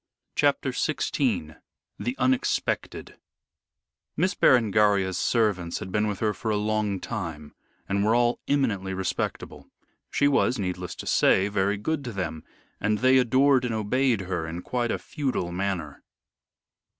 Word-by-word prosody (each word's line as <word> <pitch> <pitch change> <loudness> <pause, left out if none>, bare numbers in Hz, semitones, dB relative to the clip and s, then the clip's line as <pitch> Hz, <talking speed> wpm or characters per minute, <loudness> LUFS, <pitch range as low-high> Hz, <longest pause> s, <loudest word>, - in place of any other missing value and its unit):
CHAPTER - - +1
XVI 75 0 -1 0.4
THE 120 +2 -2
UNEXPECTED 130 0 -1 1.0
Miss 185 +4 +2
Berengaria's 105 - +3
servants 100 -8 +1
had 95 - -7
been 105 +2 +1
with 105 -2 -4
her 105 -1 +1
for 110 - -4
a 105 - +1
long 105 -2 -1
time 85 -11 -6 0.3
and 100 0 0
were 110 +2 +3
all 120 0 +2
eminently 100 -10 0
respectable. 95 -1 -4 0.4
She 145 - +2
was 135 -2 +2
needless 90 -3 -4
to - - -8
say 95 +2 +3
very 100 0 0
good 145 +8 -2
to 120 - -4
them, 85 -5 -4 0.4
and 105 0 +1
they 130 +3 +5
adored 130 +2 +4
and 120 -2 -1
obeyed 115 +1 +1
her 90 -3 -3
in 85 +2 -6
quite 120 -1 -1
a - - 0
feudal 130 - -3
manner. 90 -6 -3
105 Hz, 140 wpm, -26 LUFS, 95-125 Hz, 1.0 s, they